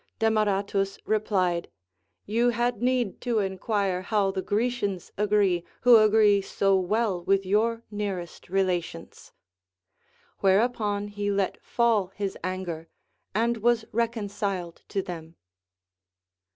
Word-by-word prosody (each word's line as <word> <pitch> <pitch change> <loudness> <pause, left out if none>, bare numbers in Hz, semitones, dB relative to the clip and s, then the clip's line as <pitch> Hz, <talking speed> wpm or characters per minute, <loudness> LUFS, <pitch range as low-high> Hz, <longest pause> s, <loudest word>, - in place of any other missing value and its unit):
Demaratus 200 -3 +1
repUed: 190 -5 +1 0.6
You 230 +4 +2
had 240 -1 -1
need 245 -5 0
to 240 -2 0
enquire 195 -1 -1
how 200 0 +1
the 190 - -3
Grecians 205 -3 -1
agree, 200 -4 +2 0.2
who 245 0 +7
aaree 215 -2 +5
so 195 0 +1
well 190 0 0
with 195 +1 +2
your 225 +4 +1
nearest 195 -6 -5
relations. 180 - -2 1.1
AVhereupon 205 0 +1
he 205 0 -2
let 200 -1 -1
fall 230 -5 +2
his 200 -2 -3
anger, 180 -3 -4 0.5
and 230 +1 +1
Avas 235 -1 +2
reconciled 205 -6 -2
to 195 - -1
them. 165 -2 -8
205 Hz, 110 wpm, -26 LUFS, 190-220 Hz, 1.1 s, who